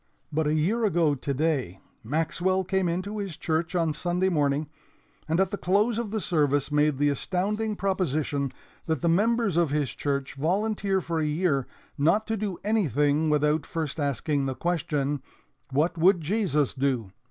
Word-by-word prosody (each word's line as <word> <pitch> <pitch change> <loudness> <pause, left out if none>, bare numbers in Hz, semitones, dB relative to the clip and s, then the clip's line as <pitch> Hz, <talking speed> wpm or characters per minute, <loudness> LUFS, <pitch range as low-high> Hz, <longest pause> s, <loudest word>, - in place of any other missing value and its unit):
"But 155 0 +1
a 150 - +2
year 200 +10 +1
ago 170 -7 +3
today 140 - -1 0.2
Maxwell 165 +8 0
came 185 -1 0
into 190 +5 -3
his 195 -6 -5
church 165 +2 -1
on 165 -3 +1
Sunday 180 +4 0
morning, 145 -2 +1 0.6
and 160 +2 +2
at 190 -1 +2
the 205 - -3
close 210 +5 +2
of 235 -3 -3
the 220 +1 -2
service 145 -6 +1
made 150 -1 +2
the 145 +1 +3
astounding 205 +8 -1
proposition 155 -8 -1 0.4
that 160 -4 0
the - - +1
members 210 +2 +2
of 170 -3 +3
his 145 -4 0
church 140 -2 -2
volunteer 195 +5 0
for 165 -1 -2
a 155 - +1
year 150 -4 0 0.3
not 170 +9 +3
to 225 - -1
do 200 -4 -3
anything 155 - +2
without 150 0 +2
first 160 -1 -4
asking 140 0 0
the 130 - -2
question, 150 -5 -1 0.5
'What 150 +5 0
would 180 +2 +5
Jesus 160 - 0
do?' 130 -7 -1
160 Hz, 165 wpm, -26 LUFS, 145-190 Hz, 0.6 s, would